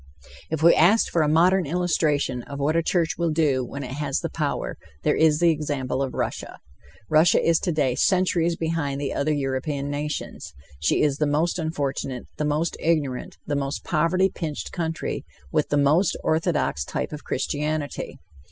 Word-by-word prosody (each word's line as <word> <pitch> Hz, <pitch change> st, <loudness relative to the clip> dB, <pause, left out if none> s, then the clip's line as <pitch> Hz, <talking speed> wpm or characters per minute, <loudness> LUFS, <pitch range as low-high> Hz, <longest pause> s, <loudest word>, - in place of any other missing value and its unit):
If 160 Hz, -1 st, -2 dB
we 170 Hz, -, +8 dB
asked 190 Hz, +8 st, +4 dB
for 170 Hz, -, +2 dB
a 155 Hz, -, +2 dB
modern 175 Hz, +2 st, +4 dB
illustration 150 Hz, -6 st, 0 dB
of 140 Hz, -, -7 dB
what 145 Hz, +3 st, 0 dB
a 165 Hz, -, +4 dB
church 165 Hz, -1 st, 0 dB
will 170 Hz, -1 st, +1 dB
do 150 Hz, -5 st, +2 dB
when 140 Hz, +3 st, -6 dB
it 125 Hz, -, -6 dB
has 140 Hz, 0 st, -2 dB
the -, -, -4 dB
power, -, -, -2 dB, 0.3 s
there -, -, +3 dB
is 155 Hz, -2 st, +4 dB
the 170 Hz, +1 st, +4 dB
example 145 Hz, -4 st, -2 dB
of 135 Hz, -2 st, -2 dB
Russia. -, -, -3 dB, 0.5 s
Russia 155 Hz, +2 st, +5 dB
is 165 Hz, -1 st, +3 dB
today 150 Hz, -7 st, +1 dB
centuries 175 Hz, +1 st, +2 dB
behind 160 Hz, -4 st, -2 dB
the 140 Hz, -1 st, -2 dB
other 145 Hz, +2 st, 0 dB
European 140 Hz, 0 st, -2 dB
nations. 150 Hz, +1 st, -4 dB, 0.3 s
She 75 Hz, -, +2 dB
is 145 Hz, -2 st, +1 dB
the 150 Hz, -, +2 dB
most 160 Hz, +5 st, +1 dB
unfortunate, 140 Hz, -5 st, -3 dB
the 150 Hz, -, -1 dB
most 150 Hz, +3 st, 0 dB
ignorant, 150 Hz, -6 st, -1 dB
the 145 Hz, -, -1 dB
most 140 Hz, 0 st, -2 dB
poverty 175 Hz, +4 st, +2 dB
pinched 155 Hz, -4 st, -5 dB
country, 165 Hz, -2 st, -3 dB, 0.3 s
with -, -, +1 dB
the 145 Hz, -, +2 dB
most 150 Hz, +6 st, +3 dB
orthodox 160 Hz, -, 0 dB
type -, -, -4 dB
of 150 Hz, -, -7 dB
Christianity. 150 Hz, 0 st, -3 dB
150 Hz, 170 wpm, -24 LUFS, 140-165 Hz, 0.5 s, we